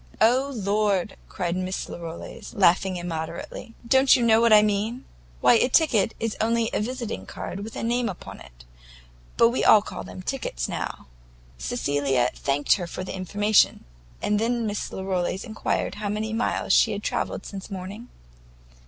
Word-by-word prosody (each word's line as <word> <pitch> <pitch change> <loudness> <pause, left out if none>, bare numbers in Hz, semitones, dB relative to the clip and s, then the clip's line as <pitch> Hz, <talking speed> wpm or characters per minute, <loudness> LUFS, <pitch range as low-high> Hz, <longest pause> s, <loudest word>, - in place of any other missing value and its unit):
"Oh, 255 +5 +3
lord!" 205 -2 0
cried 175 -2 -2
Miss 185 0 -3
Larolles, 170 +7 -8
laughing 185 -1 +3
immoderately, 170 +5 -6
"don't 265 +2 +6
you 245 - +1
know 225 0 +5
what 235 -1 +4
I 210 -1 +8
mean? 215 +4 -1 0.4
Why, - - +6
a 240 +2 +3
ticket 235 - +3
is 225 -1 -2
only 230 0 +1
a - - +1
visiting 240 0 -4
card, 190 - -6
with 215 +2 -7
a - - -4
name 240 0 0
upon 185 - -9
it; - - -15 0.7
but 230 - +6
we 245 - -1
all 210 -2 +7
call - - -7
them 185 - -9
tickets 120 - -3
now." - - -5 0.5
Cecilia 130 - 0
thanked 140 +5 +1
her 180 -3 -5
for 185 - -6
the 185 - -6
information, 205 +3 +2 0.4
and 210 0 +1
then 235 +1 0
Miss 205 -1 -3
Larolles 190 -1 -2
enquired 220 -2 -2
how 210 -1 -4
many 215 +2 -2
miles 230 +2 0
she - - +4
had - - -5
travelled - - -2
since 195 0 -8
morning? 195 +5 -7
205 Hz, 165 wpm, -25 LUFS, 185-230 Hz, 0.7 s, I